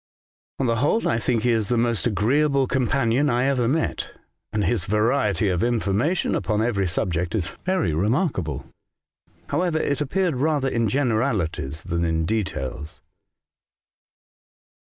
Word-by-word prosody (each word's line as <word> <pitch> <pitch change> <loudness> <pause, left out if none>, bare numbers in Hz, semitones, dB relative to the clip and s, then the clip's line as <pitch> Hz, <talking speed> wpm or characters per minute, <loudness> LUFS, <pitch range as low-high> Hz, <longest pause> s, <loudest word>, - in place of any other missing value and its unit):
'' - - -89
On 135 - +1
the 115 -1 +1
whole, 145 - +1
I 115 - +1
think 115 -1 0
he 125 - +3
is 110 -3 +1
the 120 - +2
most 115 -1 +1
agreeable 135 +6 +2
companion 130 +1 +1
I 120 0 +1
ever 130 -4 +1
met, 160 +6 -1 0.4
and 105 -1 0
his 110 +5 +1
variety 105 0 +1
of 90 0 0
information 120 - 0
upon 105 -1 0
every 100 -5 0
subject 85 0 -1
is 85 -6 -2
very 185 - +1
remarkable. 95 - -1 0.8
However, 170 +2 0
it 145 -2 -1
appeared 165 +1 0
rather 145 0 +1
in 115 -3 0
generalities 110 - -1
than 85 -1 -2
in 80 -1 0
details. 75 - -3
115 Hz, 140 wpm, -23 LUFS, 95-135 Hz, 0.8 s, he